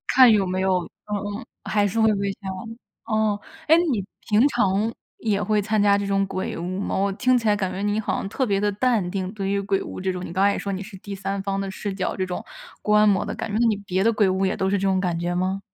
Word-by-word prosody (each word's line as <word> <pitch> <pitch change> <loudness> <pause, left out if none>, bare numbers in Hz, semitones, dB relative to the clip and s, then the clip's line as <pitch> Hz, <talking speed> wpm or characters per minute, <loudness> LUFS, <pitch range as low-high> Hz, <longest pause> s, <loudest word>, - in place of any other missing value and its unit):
看 255 -3 +9
有 205 -3 +3
没 185 +1 -1
有 190 -1 +2 0.3
嗯 205 - +1 0.2
嗯， - - -10 0.2
还 205 -1 +2
是 225 +4 -2
会 220 - +5
被 200 0 -1
吓。 195 - -11 0.6
哦， 215 -2 +1 0.3
哎， 320 - +7 0.2
你 205 -6 0 0.3
平 220 +6 +5
常 215 -4 +1 0.3
也 210 -3 0
会 210 0 +1
参 215 +1 +1
加 200 -1 +5
这 200 - -2
种 195 0 +2
鬼 185 - -3
屋 180 +3 -3
吗？ - - -2
我 195 +1 +1
听 250 +5 +3
起 225 - -1
来 210 - +4
感 190 -2 -2
觉 190 +2 -4
你 205 +1 0
好 220 - -1
像 - - -3
特 260 +5 0
别 200 -4 +1
地 205 0 +1
淡 210 -4 +1
定， 190 -1 -3
对 195 -2 -3
于 200 0 +1
鬼 195 -1 0
屋 - - -7
这 190 0 0
种， 180 0 -5
你 - - -7
刚 190 +2 +2
才 200 - +4
也 - - -3
说 200 - -3
你 190 0 -3
是 195 -1 -10
第 200 +2 -8
三 195 +1 -3
方 195 0 -1
的 195 - -3
视 200 +1 -4
角， 190 - -2
这 190 - -1
种 180 -1 -5 0.4
观 210 0 +4
摩 195 -2 +3
的 - - -4
感 - - -4
觉， 210 - 0
那 235 - +4
你 215 -3 +2
别 190 -2 -1
的 230 - +4
鬼 210 -3 +3
屋 190 +1 +1
也 190 - 0
都 190 - 0
是 200 - +2
这 195 +1 0
种 190 -1 +2
感 175 -3 -1
觉 175 +1 -1
吗？ 185 +2 -1
200 Hz, 300 characters per minute, -24 LUFS, 190-210 Hz, 0.6 s, 看